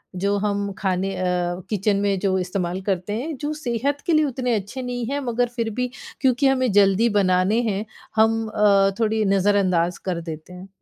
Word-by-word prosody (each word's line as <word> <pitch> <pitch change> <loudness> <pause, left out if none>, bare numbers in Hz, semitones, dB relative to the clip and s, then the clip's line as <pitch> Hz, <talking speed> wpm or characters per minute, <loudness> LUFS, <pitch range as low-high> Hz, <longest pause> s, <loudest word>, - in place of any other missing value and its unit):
जो 200 +2 0
हम 200 0 -1
खाने 190 0 -1
अ, 185 - -3 0.5
किचन 205 -1 +1
में 200 -1 +1
जो 190 0 +1
इस्तेमाल 180 0 -2
करते 190 +1 -2
हैं 285 +7 -3
जो 295 +2 -3
सेहत 280 0 -2
के 340 - +1
लिए 310 -1 +4
उतने 250 -3 -1
अच्छे 210 +6 -4
नहीं 245 -1 -3
हैं 285 - -1
मगर 245 -2 0
फिर 230 -2 -1
भी, 250 +3 -2 0.3
क्योंकि 265 +1 +3
हमें 255 -4 +2
जल्दी 200 +3 +4
बनाने 185 +4 +2
हैं 205 +2 -2 0.3
हम 225 0 +3
अ, 200 -2 +4
थोड़ी 220 -1 +1
नज़रअंदाज़ 190 -3 +2
कर 175 -2 -2
देते 160 +1 -8
हैं? 185 +2 -10
205 Hz, 185 wpm, -22 LUFS, 190-245 Hz, 0.5 s, लिए